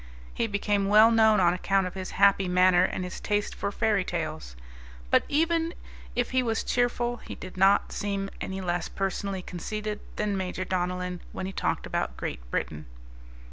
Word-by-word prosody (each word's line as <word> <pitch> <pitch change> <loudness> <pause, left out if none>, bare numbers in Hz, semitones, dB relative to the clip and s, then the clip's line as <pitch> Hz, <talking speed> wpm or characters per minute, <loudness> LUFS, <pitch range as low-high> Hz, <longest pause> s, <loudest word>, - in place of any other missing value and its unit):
He 230 - 0
became 205 -1 0
well 215 +3 +7
known 220 -2 +5
on 175 -1 +4
account 195 +1 +1
of 180 - -5
his 190 -1 -5
happy 195 -1 +5
manner 180 0 +5
and 185 - -3
his 180 - -6
taste 205 0 -1
for 200 - -3
fairy 210 -2 +1
tales. 155 - -4 0.6
But, - - +6
even 330 +2 +1 0.4
if 245 0 0
he 255 0 +3
was 225 -2 -1
cheerful, 245 0 0
he - - -9
did 185 - -9
not 195 +2 +4
seem 200 -1 -3
any 190 0 -4
less 175 -2 -2
personally 195 -1 -3
conceited 210 +4 -4 0.2
than 210 -1 -1
Major 185 -1 -3
Donellan 180 0 -2
when - - -4
he 190 - -4
talked - - -1
about 60 - -2
Great - - -4
Britain. 75 +4 -3
195 Hz, 175 wpm, -27 LUFS, 180-215 Hz, 0.6 s, well